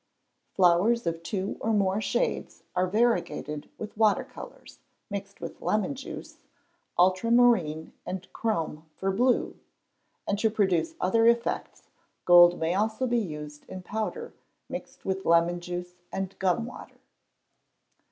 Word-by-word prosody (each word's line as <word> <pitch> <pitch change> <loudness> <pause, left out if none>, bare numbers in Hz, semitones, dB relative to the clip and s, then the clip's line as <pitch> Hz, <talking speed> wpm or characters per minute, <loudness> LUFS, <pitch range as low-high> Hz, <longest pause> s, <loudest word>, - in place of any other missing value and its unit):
Flowers 190 +6 +4
of 165 0 -2
two 190 +3 -3
or 225 - 0
more 200 0 +2
shades - - -2
are 180 0 +2
variegated 205 -8 0
with 215 0 -7
water 215 -2 +3
colours, - - -12 0.3
mixed 200 0 -6
with - - -8
lemon 215 +6 0
juice, 270 0 -8 0.6
ultramarine 185 -3 +3
and 185 0 -5
chrome 165 -8 -2
for 195 0 -1
blue; 245 +6 +1 0.7
and 200 - 0
to 220 - +3
produce 190 -7 +1
other 225 +5 +3
effects, 235 0 0 0.4
gold 175 0 +8
may 165 +1 0
also 220 +5 0
be 240 -1 +2
used 150 -6 -6
in 185 -1 -7
powder, 220 - -4 0.3
mixed - - -8
with 190 0 -2
lemon 170 +1 +3
juice 180 0 -6 0.2
and 195 0 -3
gum 190 +5 +1
water. 250 - -11
195 Hz, 130 wpm, -27 LUFS, 175-225 Hz, 0.7 s, gold